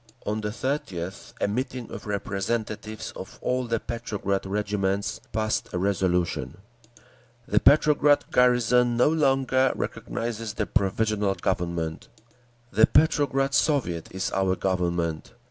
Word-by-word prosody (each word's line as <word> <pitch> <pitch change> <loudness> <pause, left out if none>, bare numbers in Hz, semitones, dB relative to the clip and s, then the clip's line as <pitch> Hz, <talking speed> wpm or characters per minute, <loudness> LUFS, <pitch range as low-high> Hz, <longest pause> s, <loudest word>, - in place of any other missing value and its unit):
On 105 +1 -1
the 105 - -2
30th 100 - -4
a - - +1
meeting 125 +2 -3
of 105 -2 -8
representatives 105 +2 -3
of - - -9
all 125 0 -1
the 115 -1 0
Petrograd 105 -5 -3
regiments 100 0 -1
passed 110 -1 -1
a - - 0
resolution: 90 -2 0 0.9
_"The - - +3
Petrograd 145 -1 +5
garrison 125 -1 +3
no 125 - +5
longer 135 -4 +2
recognises 115 -2 -4
the - - -1
Provisional 105 0 +1
Government. 85 -2 -2 0.6
The 110 +3 +5
Petrograd 140 -3 +2
Soviet 125 - +1
is 95 0 -2
our 95 -1 +1
Government. 85 -2 -1
110 Hz, 115 wpm, -26 LUFS, 95-125 Hz, 0.9 s, Petrograd